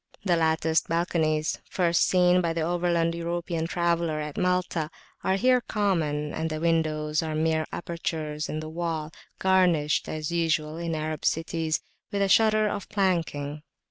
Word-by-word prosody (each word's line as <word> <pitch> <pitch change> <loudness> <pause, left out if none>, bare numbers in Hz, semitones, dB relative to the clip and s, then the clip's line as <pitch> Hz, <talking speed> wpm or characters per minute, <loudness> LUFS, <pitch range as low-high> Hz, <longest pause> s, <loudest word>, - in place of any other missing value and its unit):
The 180 -3 +3
latticed 160 -1 +2
balconies, 160 -2 0
first 170 -2 +2
seen 180 0 +4
by 170 -2 0
the 165 - -2
overland 170 0 +1
European 170 -1 -2
traveller 170 -2 0
at 150 -1 -5
Malta, 180 -3 0 0.3
are 190 - +2
here 250 +4 +3
common, 160 -10 -1
and 160 0 -2
the 155 0 -3
windows 155 -2 +1
are 160 -1 -3
[p.393]mere 160 0 +1
apertures 155 -3 -4
in 155 - -3
the 155 - -6
wall, 160 -2 -3 0.3
garnished, 180 -6 +2
as 155 0 -3
usual 160 -2 0
in 170 -1 -2
Arab 155 0 -3
cities, 160 -1 0 0.3
with 200 -1 +1
a - - +2
shutter 215 0 +4
of 205 -1 -4
planking. 165 -7 -1
165 Hz, 150 wpm, -26 LUFS, 155-175 Hz, 0.3 s, seen